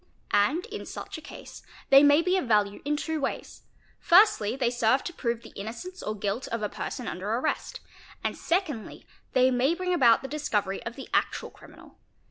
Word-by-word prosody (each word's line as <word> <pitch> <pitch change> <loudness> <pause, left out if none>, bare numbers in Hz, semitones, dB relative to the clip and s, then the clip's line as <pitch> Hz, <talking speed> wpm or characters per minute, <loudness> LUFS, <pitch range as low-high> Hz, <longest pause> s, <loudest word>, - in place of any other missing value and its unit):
And 275 - +2
in 440 -2 -7
such - - -7
a - - -14
case - - -11 0.3
they 275 0 +9
may 290 +2 +5
be 365 +2 +2
of 370 -9 -1
value 205 -2 +2
in 295 +1 0
two 315 0 -3
ways; - - -4 0.4
firstly 345 - +4
they 250 -3 0
serve 240 +2 +2
to 350 - -5
prove 235 -5 -3
the 225 - -12
innocence 235 - -7
or 215 - -3
guilt 205 +5 -2
of 230 -1 -3
a 210 - -1
person 250 -4 -5
under 185 +4 -4
arrest, 250 +7 -2 0.4
and - - -1
secondly 335 - -2 0.3
they 255 0 +4
may 260 +6 +2
bring 365 0 -1
about 245 -7 +5
the - - -4
discovery 210 -10 -2
of 230 - -6
the 270 - -9
actual - - 0
criminal. - - -17
260 Hz, 190 wpm, -27 LUFS, 225-320 Hz, 0.4 s, they